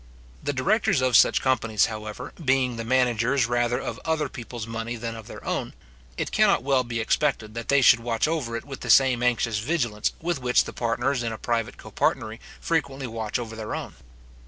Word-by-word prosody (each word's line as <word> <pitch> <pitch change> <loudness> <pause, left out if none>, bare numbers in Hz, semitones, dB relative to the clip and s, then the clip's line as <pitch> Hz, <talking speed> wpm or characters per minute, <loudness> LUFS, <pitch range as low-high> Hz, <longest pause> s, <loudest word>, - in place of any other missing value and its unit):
The 145 - -1
directors 175 - +2
of 130 -2 +2
such - - +5
companies, 115 -5 +2
however, 105 -1 -6
being 130 -2 +2
the 115 - -3
managers 125 +1 +2
rather 120 +1 +1
of 115 - -5
other 160 -3 0
people's 120 -2 -7
money 115 +1 -4
than 115 0 -5
of 110 -2 -10
their - - -10
own, - - -3 0.4
it - - -3
cannot - - +3
well 135 -1 +2
be 120 -1 -4
expected 110 -2 0
that 115 0 -6
they 140 0 +4
should 115 - +7
watch 115 +2 0
over 150 -8 -2
it - - -8
with 135 -1 -8
the - - -7
same 130 -3 +5
anxious 120 -3 +1
vigilance 120 -5 -1
with 170 -4 -2
which 125 0 +3
the - - -8
partners 120 +3 0
in 115 -1 -2
a 110 - -5
private 115 -1 -2
copartnery 110 +1 -2 0.2
frequently 140 -5 -1
watch 115 -2 -3
over 115 -2 -6
their 110 -1 -4
own. - - -6
120 Hz, 195 wpm, -25 LUFS, 115-135 Hz, 0.4 s, should